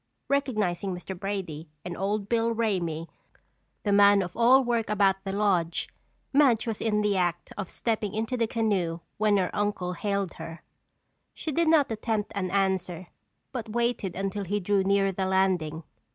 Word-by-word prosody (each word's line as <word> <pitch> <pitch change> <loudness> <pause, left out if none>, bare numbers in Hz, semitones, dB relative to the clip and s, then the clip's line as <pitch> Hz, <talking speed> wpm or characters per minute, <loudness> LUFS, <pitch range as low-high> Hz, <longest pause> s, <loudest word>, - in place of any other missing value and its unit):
Recognizing 210 -10 0
Mr. 185 +2 -7
Brady 180 -6 -4 0.2
and 175 -1 -4
Old 200 +2 -1
Bill 230 0 +1
Ramey, 175 -8 -1 0.8
the 205 - 0
man 200 0 +6
of 180 -1 -7
all 250 +3 +6
work 235 -3 0
about 195 -2 +2
the 195 - -3
lodge, 185 -5 0 0.4
Madge 270 -6 +4
was 225 -3 -3
in 210 -2 +1
the 205 -1 +2
act 175 -2 -1
of 190 - -5
stepping 215 -3 -2
into 225 +4 -1
the 230 -2 +1
canoe 195 -8 0 0.2
when 210 -1 +4
her 185 -2 -1
uncle 205 -3 -1
hailed 200 -1 -2
her. 165 0 -8 0.7
She 315 - -4
did 335 +3 +2
not 310 -6 +4
attempt 220 -1 -2
an 190 -3 -2
answer 185 -2 -1 0.4
but 240 -4 -5
waited 235 -6 0
until 195 +1 -2
he 205 +3 -1
drew 200 +1 +2
nearer 195 0 +2
the 190 0 -2
landing. 180 -4 +1
200 Hz, 165 wpm, -27 LUFS, 185-220 Hz, 0.8 s, man